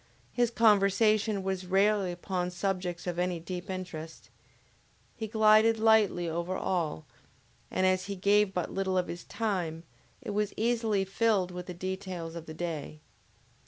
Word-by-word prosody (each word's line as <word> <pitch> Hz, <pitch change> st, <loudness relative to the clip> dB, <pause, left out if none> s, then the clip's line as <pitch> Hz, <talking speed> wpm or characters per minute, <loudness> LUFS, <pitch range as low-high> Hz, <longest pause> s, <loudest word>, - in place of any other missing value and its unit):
His 240 Hz, -1 st, +2 dB
conversation 215 Hz, -1 st, +3 dB
was 190 Hz, -1 st, -3 dB
rarely 195 Hz, 0 st, +2 dB
upon 180 Hz, 0 st, -3 dB
subjects 180 Hz, -1 st, -3 dB
of 175 Hz, -1 st, -3 dB
any 180 Hz, -1 st, 0 dB
deep 180 Hz, +3 st, -6 dB
interest. 175 Hz, -4 st, -7 dB, 0.8 s
He 220 Hz, -, -4 dB
glided 220 Hz, +1 st, +5 dB
lightly 220 Hz, -5 st, +3 dB
over 170 Hz, +3 st, -2 dB
all, 160 Hz, -, -2 dB, 0.6 s
and 185 Hz, -, 0 dB
as 185 Hz, 0 st, +2 dB
he 200 Hz, +1 st, -4 dB
gave 205 Hz, +1 st, +3 dB
but 180 Hz, -3 st, -3 dB
little 190 Hz, -1 st, 0 dB
of 180 Hz, -, +1 dB
his 175 Hz, -, -6 dB
time, 180 Hz, -8 st, -2 dB, 0.4 s
it 245 Hz, -5 st, -6 dB
was 210 Hz, 0 st, -1 dB
easily 225 Hz, -4 st, +1 dB
filled 195 Hz, -2 st, +1 dB
with 180 Hz, 0 st, -7 dB
the 180 Hz, -, -6 dB
details 185 Hz, -2 st, -5 dB
of 165 Hz, -1 st, -8 dB
the 155 Hz, -, -8 dB
day. 155 Hz, -3 st, -5 dB
190 Hz, 150 wpm, -29 LUFS, 175-210 Hz, 0.8 s, glided